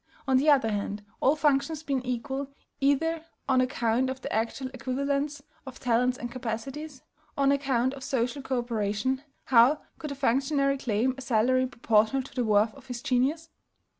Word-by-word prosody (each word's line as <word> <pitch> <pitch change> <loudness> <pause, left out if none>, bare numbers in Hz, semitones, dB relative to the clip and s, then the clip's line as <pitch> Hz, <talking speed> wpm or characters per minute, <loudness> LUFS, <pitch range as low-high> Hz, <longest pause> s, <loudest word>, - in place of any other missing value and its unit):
On 265 -1 +4
the 290 +4 +3
other 260 -7 +4
hand, 205 0 -3
all 275 +3 +4
functions 300 +1 +1
being 275 -4 -1
equal, 265 +2 -3 0.3
either 315 +4 +1 0.2
on 260 -2 +4
account 255 -1 +1
of 260 0 -4
the - - -5
actual 230 +4 -2
equivalence 280 +3 -2 0.2
of 265 - -9
talents 250 +1 +2
and 240 -1 -6
capacities, 260 +4 -5 0.3
or 280 - +2
on 275 - +5
account 265 -2 +1
of 270 -1 -9
social 255 +2 -1
co 265 -1 -2
operation, 235 +2 -1 0.2
how 255 +4 +5 0.2
could 300 -2 -5
a - - -4
functionary 275 +1 +1
claim 245 +1 +1
a - - -6
salary 255 +2 +2
proportional 230 +1 +2
to 270 - -13
the 250 - 0
worth 215 0 +3
of 275 -2 -16
his 245 -1 -6
genius? 280 +6 0
260 Hz, 170 wpm, -28 LUFS, 240-275 Hz, 0.3 s, on